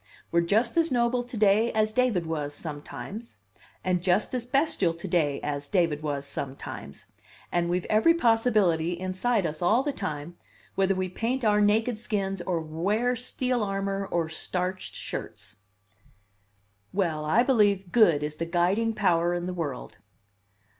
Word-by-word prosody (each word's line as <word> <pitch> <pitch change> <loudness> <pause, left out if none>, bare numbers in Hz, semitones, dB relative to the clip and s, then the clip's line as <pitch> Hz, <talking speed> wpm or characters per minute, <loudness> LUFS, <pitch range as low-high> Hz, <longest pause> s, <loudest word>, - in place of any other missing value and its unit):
We're 170 - +4
just 215 +7 +1
as 330 -2 +3
noble 245 0 +2
to 245 -1 -7
day 215 +2 +4
as 215 0 +2
David 230 -7 +1
was 150 -3 -3
sometimes, 170 +9 -7 0.5
and 180 -1 +1
just 180 +6 +1
as 245 -1 -2
bestial 250 - +1
to 170 - -7
day 150 -6 +1
as 145 -1 -3
David 165 -4 +1
was 145 -2 -3
sometimes, 135 - -6 0.5
and 170 0 +1
we've 180 0 0
every 225 +11 +4
possibility 215 - +2
inside 185 +3 0
us 155 0 -4
all 220 +9 +3
the 290 0 -1
time, 170 - -5 0.4
whether 195 0 +2
we 185 0 -1
paint 230 +7 -2
our 210 -1 +4
naked 215 +2 +2
skins, 195 -5 -2
or 175 -1 -1
wear 200 +11 0
steel 250 0 -1
armor 195 0 -2
or 170 -3 0
starched 180 +3 -3
shirts." 105 - -4 1.3
"Well, 165 -6 0
I 160 +11 +3
believe 205 -8 +2
good 170 -11 +5
is 150 0 -4
the 165 - -3
guiding 190 +7 +1
power 175 -4 +2
in 175 0 -3
the 180 - -3
world." 150 -8 -5
190 Hz, 155 wpm, -27 LUFS, 165-225 Hz, 1.3 s, good